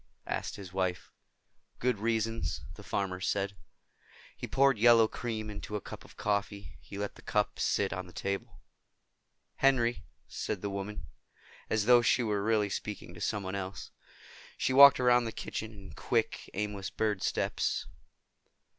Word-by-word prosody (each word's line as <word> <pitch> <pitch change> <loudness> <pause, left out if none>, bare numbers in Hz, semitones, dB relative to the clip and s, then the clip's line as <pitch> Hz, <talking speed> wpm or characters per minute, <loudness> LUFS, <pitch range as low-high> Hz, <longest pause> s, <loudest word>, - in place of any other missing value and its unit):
asked - - -3
his 95 -3 -10
wife. 95 -2 -2 0.7
"Good 125 -4 0
reasons," 115 0 -1
the - - -11
farmer 95 -2 -2
said. 100 0 0 0.8
He - - -6
poured 135 -3 +3
yellow 115 -1 +7
cream 110 -2 -4
into 105 0 -6
a - - 0
cup - - -9
of - - -17
coffee. 100 -1 -2
He 100 - -9
let 100 0 -3
the - - -15
cup - - 0
sit 95 -3 +1
on 90 +1 -5
the - - -12
table. 100 +3 -4 1.0
"Henry?" 120 -3 +3 0.2
said 100 -3 -4
the 100 - -2
woman, 100 +2 -5 0.6
as 110 -2 +1
though 120 0 +7
she 120 +1 +3
were 105 -3 0
really 105 -1 +1
speaking 105 -5 -5
to 85 - -11
someone 100 -3 -2
else. 100 0 -5 0.7
She 130 - 0
walked 140 0 +9
around 125 -1 +4
the 115 - -3
kitchen 110 0 -5
in 100 -3 -12
quick - - -1
aimless 105 -1 -3
bird 105 -3 -1
steps. - - 0
105 Hz, 155 wpm, -31 LUFS, 100-115 Hz, 1.0 s, walked